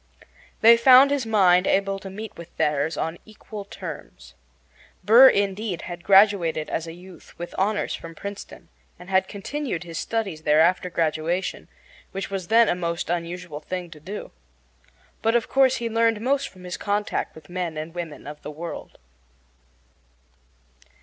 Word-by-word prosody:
They 230 +1 +8
found 260 +3 +7
his 275 -5 -1
mind 185 -4 +4
able 195 0 +1
to 195 - -9
meet 210 +3 -8
with 170 0 -12
theirs 150 +1 0
on 165 +1 -3
equal 215 -1 -10
terms. - - -9 0.7
Burr, 235 +7 +9
indeed, 200 -2 -1
had 175 0 -7
graduated 190 -6 +4
as 165 - -2
a 165 - -7
youth 180 0 -15
with 175 0 -7
honors 205 +2 0
from 165 0 -8
Princeton, 200 +4 -9 0.3
and 180 +2 -12
had 190 0 +3
continued 215 - -4
his 165 -2 -6
studies 200 -9 -3
there 150 0 +3
after 180 +2 +3
graduation, 165 +2 -2 0.5
which 195 0 -5
was 190 -3 -4
then 230 0 +5
a - - +2
most 170 -1 -3
unusual 175 -2 -4
thing 180 +1 -6
to 155 - -12
do. 195 +7 -8 0.9
But, 225 +1 +2
of 235 - +1
course, 265 -1 +3
he 235 -2 -3
learned 230 -1 +2
most 275 +4 0
from 185 -1 -16
his 180 0 -5
contact 205 +1 -2
with 155 -1 -14
men 175 -3 -4
and 155 +2 -6
women 170 -4 -7
of 150 +1 -9
the - - -7
world. 165 +3 -8
185 Hz, 160 wpm, -24 LUFS, 170-215 Hz, 0.9 s, Burr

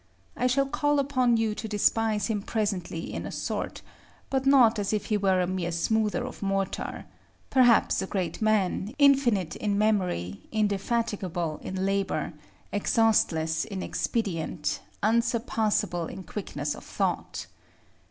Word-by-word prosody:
I 250 - +1
shall 275 +2 +2
call 290 +1 +1
upon 255 -4 +2
you 225 -1 +1
to 220 - -5
despise 215 0 +2
him 215 -3 -1
presently 195 -6 -2
in - - -4
a - - -6
sort, - - -4 0.5
but 265 0 0
not 245 -5 +6
as 205 +1 -1
if 210 - -1
he - - +4
were 190 -2 +2
a 180 - +2
mere 180 -1 -2
smoother 220 +7 0
of 255 - -8
mortar; 195 -1 -2 0.5
perhaps 245 -6 +4
a 190 - -3
great 185 -3 -3
man, 215 +1 +1
infinite 255 - +4
in 205 -1 0
memory, 180 - 0
indefatigable 200 -6 -1
in 190 0 -3
labor, 195 -3 -1 0.4
exhaustless 175 -7 +2
in 195 -4 -5
expedient, 170 -8 -2 0.2
unsurpassable 220 -6 +1
in 190 - -8
quickness 150 -5 -4
of - - -10
thought. - - -2
210 Hz, 135 wpm, -27 LUFS, 185-230 Hz, 0.5 s, not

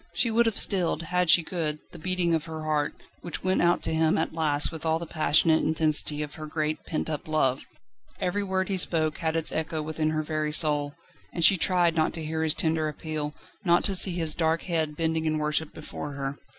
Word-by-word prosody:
She 235 - +1
would 230 +1 +3
have 225 - 0
stilled, 175 -3 +1
an 180 0 +2
she 170 +1 +6
could, 160 -3 -2
the - - -11
beating 180 0 0
of 160 -1 0
her 160 -1 -7
heart, 150 -1 -1 0.3
which 175 - -5
went 185 0 +1
out 175 0 +2
to 160 - 0
him 160 0 +2
at 160 - -1
last 150 -3 +1
with 160 -2 -7
all 160 0 +1
the 170 - -6
passionate 160 0 +3
intensity 155 -1 +1
of 150 - -8
her 155 -1 -8
great, 155 0 -2
pent 155 - -3
up 155 -2 -4
love. 135 -5 +1 0.5
Every 180 +3 -1
word 190 -1 -1
he 195 - -1
spoke 160 -4 0
had 160 -1 -1
its 165 -1 +2
echo 160 -1 -2
within 155 0 -1
her 155 0 -1
very 155 0 -2
soul, 145 -2 +2 0.4
and 170 - +2
she 195 - +8
tried 175 -1 +2
not 155 -1 +1
to 160 -2 -6
hear 160 +1 -2
his 160 -1 +1
tender 160 -1 +2
appeal, 150 0 -4 0.3
not 175 -1 +3
to 200 - 0
see 185 0 +4
his 165 -3 0
dark 160 0 0
head 160 -4 -2
bending 160 -1 0
in 155 0 0
worship 150 0 -1
before 150 -1 -7
her. 140 0 -5
160 Hz, 220 wpm, -26 LUFS, 155-170 Hz, 0.5 s, she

